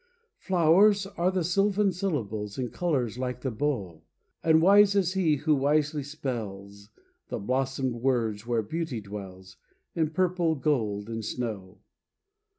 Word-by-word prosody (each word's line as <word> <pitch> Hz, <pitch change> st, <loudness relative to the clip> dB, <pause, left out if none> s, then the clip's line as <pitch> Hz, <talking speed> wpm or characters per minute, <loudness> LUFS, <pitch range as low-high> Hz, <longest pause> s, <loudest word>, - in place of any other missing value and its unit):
Flowers 190 Hz, +3 st, +4 dB
are 185 Hz, -2 st, -1 dB
the 185 Hz, -2 st, -1 dB
sylvan 195 Hz, +3 st, +2 dB
syllables, 110 Hz, -, -3 dB
In 125 Hz, -2 st, -2 dB
colors 130 Hz, -9 st, -1 dB
like 125 Hz, -1 st, -3 dB
the 130 Hz, -, -2 dB
bow, 105 Hz, -, -3 dB, 0.4 s
And 160 Hz, -1 st, +5 dB
wise 200 Hz, +3 st, +6 dB
is 185 Hz, -2 st, +2 dB
he 175 Hz, -6 st, +2 dB
who 150 Hz, +2 st, +1 dB
wisely 150 Hz, +2 st, +1 dB
spells 105 Hz, -8 st, -6 dB, 0.4 s
The -, -, -4 dB
blossomed 130 Hz, +3 st, -1 dB
words 115 Hz, -4 st, -1 dB
where 115 Hz, -2 st, 0 dB
beauty 155 Hz, +1 st, -3 dB
dwells, 95 Hz, -2 st, -9 dB, 0.4 s
In 160 Hz, -2 st, 0 dB
purple, 175 Hz, -1 st, +1 dB
gold 110 Hz, -8 st, -1 dB
and 115 Hz, -1 st, -5 dB
snow. 105 Hz, -5 st, -5 dB
135 Hz, 135 wpm, -27 LUFS, 110-170 Hz, 0.4 s, wise